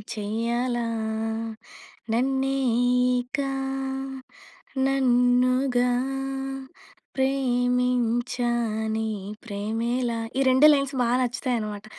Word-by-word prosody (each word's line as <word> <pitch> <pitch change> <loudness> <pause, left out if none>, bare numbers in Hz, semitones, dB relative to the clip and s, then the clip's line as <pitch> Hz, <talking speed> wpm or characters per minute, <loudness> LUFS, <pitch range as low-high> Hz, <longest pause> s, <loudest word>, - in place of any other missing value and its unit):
చెయ్యాలా. 235 +3 -1 1.3
నన్నే 270 +2 +1 0.6
ఇక 250 +3 -5 1.5
నన్నుగా 250 -1 +3 1.3
ప్రేమించానే 245 -3 0 0.4
ప్రేమేలా. 230 +3 -2 0.2
ఈ - - +3
రెండే 260 +3 +6
లైన్స్ 275 -1 +1
బాగా 240 0 +2
నచ్చుతాయి 250 +1 -1
అన్నమాట. 210 -1 -5
245 Hz, 60 wpm, -25 LUFS, 230-255 Hz, 1.5 s, రెండే